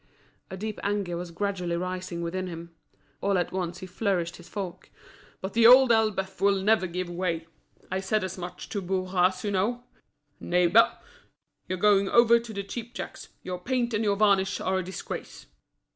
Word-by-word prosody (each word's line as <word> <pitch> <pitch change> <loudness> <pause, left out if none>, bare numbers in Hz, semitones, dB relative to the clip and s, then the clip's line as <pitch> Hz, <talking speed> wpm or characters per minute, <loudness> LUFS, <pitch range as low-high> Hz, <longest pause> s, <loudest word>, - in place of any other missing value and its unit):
A 190 - -6
deep 215 +2 -5
anger 200 -3 -1
was 175 0 -5
gradually 180 -1 -2
rising 180 -1 -4
within 185 +2 -3
him. 170 -1 -8 0.5
All 200 -1 +2
at 175 - -1
once 180 -2 -3
he - - -5
flourished 180 -3 -1
his 175 - -14
fork. 195 -4 -6 0.5
"But 190 +1 -5
The 230 0 +6
Old 255 0 +8
Elbeuf 215 -4 +1
will 200 0 +4
never 215 -2 +3
give 180 +1 -3
way! 175 -2 -2 0.5
I 190 - 0
said 195 +2 0
as 185 -1 -4
much 180 -1 -7
to 200 - -3
Bourras, 185 0 0
you 205 - -1
know, 220 +6 0 0.6
'Neighbour, 180 +5 +4 0.7
you're 185 - -2
going 200 0 +4
over 235 0 +6
to 230 -1 -9
the 200 -2 -4
cheapjacks; 235 +4 -7 0.2
your 180 -1 -4
paint 245 +3 -1
and 215 +1 +1
your 205 -2 +2
varnish 200 -2 +3
are 190 0 0
a - - -3
disgrace.'" 185 +2 -7
190 Hz, 175 wpm, -27 LUFS, 180-210 Hz, 0.7 s, Old